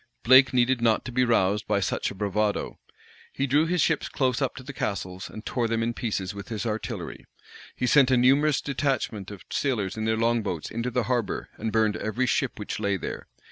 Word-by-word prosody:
Blake 130 +2 +7
needed 125 0 +2
not 115 -2 +2
to 130 - -5
be 125 +1 +2
roused 105 -4 +2
by 105 -1 +2
such 100 - -1
a - - -8
bravado: 105 +1 -1 0.5
he 135 - -1
drew 145 +4 +3
his 175 -1 +2
ships 165 - 0
close 130 -2 0
up 135 - -1
to 130 - -9
the 140 +2 -8
castles, 95 -6 -4
and 110 - -10
tore 120 -2 -1
them 115 0 0
in 120 +1 -1
pieces 100 -6 -3
with 100 -2 -8
his 110 0 -4
artillery. 110 -1 -4 0.5
He 125 - -1
sent 135 +1 +5
a 130 - +4
numerous 140 +4 +4
detachment 130 -8 -2
of 100 -3 -10
sailors 110 -9 -1
in 110 - -2
their 110 0 +1
long 115 +1 +2
boats 90 -7 -4
into 115 +2 -2
the 125 0 0
harbor, 120 -3 -2
and 110 +1 -3
burned 110 -1 +2
every 110 +4 -1
ship 130 +1 0
which 105 - -5
lay 100 -2 0
there. - - -6
115 Hz, 215 wpm, -26 LUFS, 105-130 Hz, 0.5 s, Blake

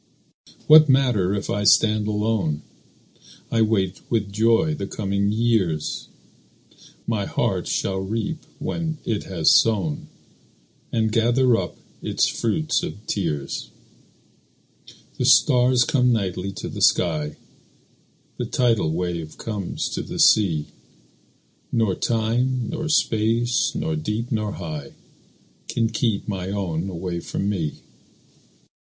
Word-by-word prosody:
What 155 -1 +8
matter 120 -8 +3
if 100 - -3
I 105 - -1
stand 105 0 +4
alone? 105 -8 -1 0.9
I 115 - +2
wait 95 -4 +1
with 105 -4 -1
joy 115 +9 +3
the 100 -10 -4
coming 100 0 -1
years; 105 -9 0 1.0
My 110 -4 -1
heart - - -1
shall 95 -1 -1
reap 115 - -3 0.2
when 160 -2 -3
it 110 -3 -2
has 85 -5 +2
sown, 95 -10 +2 0.8
And 110 -1 +1
gather 120 +2 +3
up - - -3 0.2
its - - +1
fruit 155 +8 0
of 105 +2 -7
tears. 75 -8 -3 1.5
The - - +1
stars 125 0 +5
come 125 -2 +2
nightly 95 -4 -1
to - - -6
the - - -6
sky; 75 -4 +2 1.0
The - - -2
tidal 115 -10 +1
wave 85 -2 -3
comes 105 -5 -4
to - - -3
the - - -7
sea; 85 -9 +4 1.1
Nor 110 -5 +1
time, 120 +3 0
nor 160 - -3
space, 115 -4 +1
nor 160 -1 -1
deep, 115 -6 -3
nor 105 -3 -1
high, 75 -5 -7 0.7
Can 115 -1 0
keep 110 -2 -1
my 95 -3 -3
own 95 -3 -2
away 90 -1 -4
from 100 - -3
me. 85 -7 -3
105 Hz, 120 wpm, -23 LUFS, 95-115 Hz, 1.5 s, What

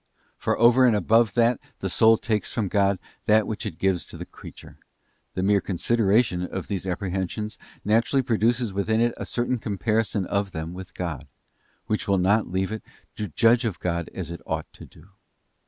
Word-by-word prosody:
For - - -1
over 120 +3 +6
and 115 - +4
above 110 +2 +3
that 120 +1 +3 0.2
the 95 - -3
soul 110 +4 +5
takes 110 -2 -2
from 105 -4 -1
God 100 -1 +2 0.3
that 110 0 +5
which 110 0 -4
it 85 -6 -7
gives 95 -2 +1
to - - -9
the - - -6
creature, - - -13 0.6
the 95 - -1
mere 100 0 +3
consideration 105 0 +1
of 90 +1 -5
these 95 -2 -3
apprehensions 95 +3 -3 0.3
naturally 115 +5 +2
produces 120 -2 +1
within 110 +3 0
it 120 0 +2
a - - -5
certain 120 0 -1
comparison 105 -1 -1
of 100 0 -1
them 80 0 -5
with 95 0 -10
God, 85 -7 -4 0.6
which 110 -1 -2
will 100 -1 +3
not 100 +4 +2
leave 95 +2 -1
it 110 - -4 0.3
to 105 - -3
judge 115 - +3
of 110 -8 -2
God 85 -2 -2
as 85 -4 -6
it 85 - -7
ought - - -2
todo. 85 +5 -15
105 Hz, 180 wpm, -25 LUFS, 95-115 Hz, 0.6 s, over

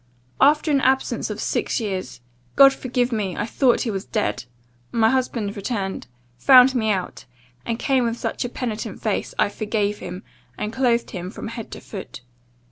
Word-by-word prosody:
"'After 300 +3 +4
an 280 -2 +3
absence 265 0 +1
of - - -5
six - - -1
years 190 - -4 0.3
(God 275 -1 +8
forgive 250 -1 -1
me! 205 -5 -2
I 210 - -1
thought 245 +1 +2
he 230 - -1
was 195 -1 -3
dead) 215 - -2 0.5
my 225 -1 +3
husband 235 -6 -1
returned; 200 -2 -3 0.3
found 260 - +7
me 225 -4 0
out, 190 -4 -2 0.4
and 230 -1 -1
came 260 0 +1
with 230 0 -1
such - - -3
a 245 - -3
penitent 230 -3 -4
face, - - -2
I - - +3
forgave 210 0 -2
him, 180 +2 -7 0.3
and 210 +1 -4
clothed 240 -2 +1
him 180 -2 -5
from 220 - -7
head 230 -1 -7
to - - -7
foot. 190 - -9
230 Hz, 175 wpm, -22 LUFS, 205-255 Hz, 0.5 s, God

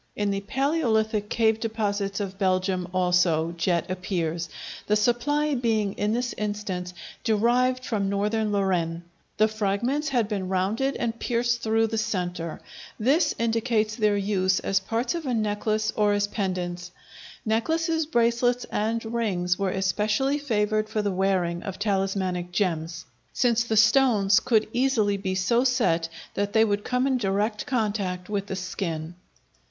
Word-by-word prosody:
In 205 -1 0
the 195 0 -2
palæolithic 220 -4 0
cave 225 -1 +2
deposits 205 -3 -2
of 195 -1 -5
Belgium 185 -1 +1
also, 180 -3 +2
jet 170 0 0
appears, 170 -3 -2 0.4
the 210 - +3
supply 290 +7 +1
being 220 -5 0
in 210 +1 -1
this 245 +2 -1
instance 200 -4 -3 0.3
derived 245 +3 +2
from 200 -4 -1
northern 210 +2 0
Lorraine. 175 -4 0 0.3
The 215 - +5
fragments 220 +8 -1
had 240 -6 +1
been 195 -3 -3
rounded 210 +9 0
and 230 -1 -2
pierced 240 -1 0
through 225 0 +2
the 225 0 -1
centre. 180 -6 -3 0.4
This 300 +8 +2
indicates 225 -1 0
their 210 -3 +2
use 190 -2 +1
as 195 - +1
parts 225 - -2
of 335 -4 -4
a 250 - 0
necklace 215 0 0
or 210 -1 +3
as 205 0 +2
pendants. 180 -4 -3 0.6
Necklaces, 320 +8 0
bracelets, 240 -2 +2
and 225 +2 -1
rings 200 -6 -1
were 195 -1 +1
especially 210 +9 0
favored 215 -5 0
for 215 -1 -1
the 205 - 0
wearing 185 -2 0
of 190 -1 -6
talismanic 190 -3 -1
gems, 170 -3 -2 0.3
since 235 -2 +2
the 225 -1 -1
stones 210 -4 +5
could 220 -3 +2
easily 235 -6 +2
be 190 -1 -2
so 235 +6 +2
set 220 -11 +1 0.2
that 205 0 -2
they 220 0 +5
would 205 -1 -1
come 250 +1 0
in 265 -2 +1
direct 210 +1 -1
contact 205 -7 -1
with 200 -1 -2
the 190 - -3
skin. 170 -3 -4
210 Hz, 145 wpm, -25 LUFS, 190-230 Hz, 0.6 s, The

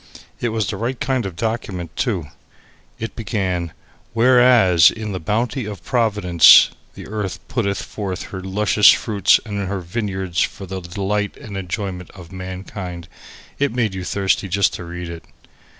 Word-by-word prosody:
It 120 - -1
was 110 -1 -1
the 100 - -3
right 120 +4 -3
kind 130 -5 0
of 90 - -8
document 95 -5 -4
too. 100 - -1 0.7
It 115 -1 -6
began 95 -6 -2 0.4
"Whereas 120 -7 +6
in 110 -2 -5
the 95 - -3
bounty 115 - -1
of 100 -5 -7
providence 105 - +6 0.2
the - - -9
earth 105 -3 -4
putteth 100 -6 -1
forth 95 -4 -5
her 95 - -4
luscious 105 +2 +4
fruits 105 -3 +4
and 100 -3 -3
her 100 0 -2
vineyards 95 -2 -3
for 100 - -2
the 95 0 -5
delight 100 +4 -2
and 100 - -9
enjoyment 95 -1 -4
of 90 -2 -12
mankind 95 -2 -7 0.2
" - - -21
It 140 -3 +1
made 115 -5 0
you 95 -1 -5
thirsty 95 +1 0
just 100 +1 +2
to 90 - -6
read 85 +1 -6
it. 85 0 -8
100 Hz, 160 wpm, -20 LUFS, 90-110 Hz, 0.7 s, Whereas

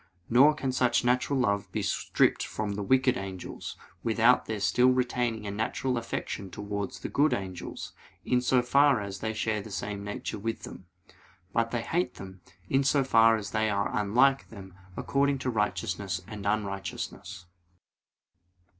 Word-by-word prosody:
Nor 140 +6 +6
can 135 -3 -2
such 125 -2 +2
natural 125 +3 +2
love 100 -6 0
be - - -2
stripped - - +1
from 105 -1 -3
the 100 - -4
wicked 130 +5 +3
angels, 95 -2 -7 0.3
without 115 +2 +3
their 110 -1 -3
still 125 +5 +3
retaining 125 -3 0
a 100 - -3
natural 110 +5 -1
affection 115 -4 -4
towards 100 0 -5
the - - -3
good 150 +2 +2
angels, 95 -3 -6 0.3
in 125 0 +2
so 125 0 +3
far 140 0 +4
as 100 -1 -6
they 110 +2 -2
share 110 -1 -1
the 110 - -10
same 100 0 -4
nature 105 0 -5
with 115 +2 -4
them. 95 - -10 0.7
But 115 0 +1
they 115 -1 -2
hate 175 +8 -1
them, 95 -1 -10 0.3
in 135 +5 +2
so 140 0 +3
far 115 -3 +5
as 105 -1 -5
they 110 0 +1
are 100 -1 -1
unlike 125 +7 +3
them 95 -4 -11 0.2
according 140 0 +1
to 125 - +1
righteousness 100 -3 -1
and 105 -1 -6
unrighteousness. 100 -2 -4
110 Hz, 160 wpm, -28 LUFS, 100-125 Hz, 0.7 s, Nor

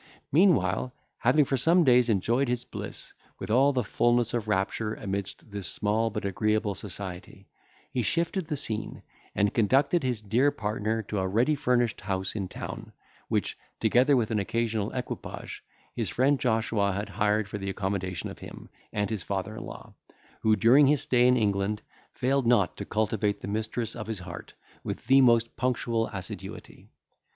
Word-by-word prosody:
Meanwhile, 125 - +3 0.2
having 140 +5 +4
for 135 - 0
some 170 +7 +4
days 125 -3 +5
enjoyed 115 +6 +2
his 125 0 -1
bliss - - -8 0.2
with - - -5
all 135 +5 +5
the 130 -3 0
fulness 120 +2 +2
of 115 -3 -2
rapture 105 +2 -1
amidst 100 +1 -5
this 100 -4 -3
small 110 +5 0
but 105 -1 -4
agreeable 105 +1 0
society, 95 0 -7 0.4
he 125 - 0
shifted 170 - 0
the 150 -2 -2
scene, 110 -6 -4 0.3
and 100 0 +2
conducted 135 - +3
his 125 -4 -1
dear 115 +7 +2
partner 110 -1 -2
to 105 0 -3
a 95 - 0
ready 115 +10 +2
furnished 125 -5 +1
house 95 -2 -2
in 100 -3 -2
town, - - -7 0.3
which, - - -1 0.2
together 125 +5 +4
with 115 -2 0
an 110 - +1
occasional 110 0 -1
equipage, 125 -1 -6 0.3
his - - -1
friend 135 +2 +2
Joshua 110 -4 +1
had 100 +2 -3
hired 105 0 +1
for 105 0 -5
the 95 0 -4
accommodation 95 -2 -3
of - - -9
him - - -10 0.2
and 105 -1 0
his 110 -4 -2
father 100 +4 -3
in 110 - -6
law, - - -10 0.5
who, 110 -1 +4
during 120 +8 +6
his 145 -1 +3
stay 125 -1 +4
in 125 0 +4
England, 105 -1 0 0.3
failed 135 0 0
not 110 -7 +3
to - - -5
cultivate 105 -1 0
the - - -6
mistress 110 +2 -3
of 110 -3 -6
his 110 -1 -3
heart 90 -1 -9 0.3
with - - -5
the 135 +1 +6
most 115 -2 +4
punctual 115 -2 0
assiduity. 95 -3 -8
110 Hz, 170 wpm, -28 LUFS, 100-125 Hz, 0.5 s, during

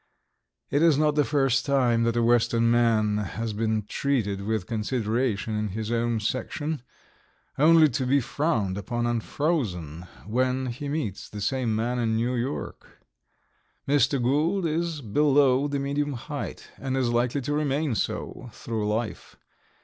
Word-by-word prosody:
It 145 - +2
is 165 -4 +5
not 150 0 +3
the 150 0 +3
first 135 -2 +2
time 125 -5 +2
that 115 0 +1
a 120 - +2
Western 115 0 +3
man 110 -3 +3
has 110 +2 -3
been 110 0 0
treated 105 -4 -1
with 105 -2 -2
consideration 110 0 -1
in 105 0 -1
his 110 +3 -4
own 120 -1 0
section, 135 +6 -3 0.8
only 160 +1 +7
to 130 0 -2
be 140 +2 +4
frowned 125 - -1
upon 120 +3 -2
and 120 -2 0
frozen 90 - -2 0.2
when 130 +4 0
he 140 +4 -6
meets 140 - -3
the 105 - -7
same 115 +2 0
man 120 +3 -1
in 110 -2 +1
New 120 +3 0
York. 125 +3 -5 0.8
Mr. 140 -1 +3
Gould 155 +10 +1
is 165 -1 -1
below 140 +2 +3
the 140 -1 -2
medium 140 +1 -1
height, 145 +4 -6
and 135 -1 -2
is 125 -3 +1
likely 120 +3 +1
to 145 +3 -2
remain 145 -1 0
so 120 +2 -3
through 110 -2 -3
life. 110 +1 -4
125 Hz, 150 wpm, -26 LUFS, 110-140 Hz, 0.8 s, only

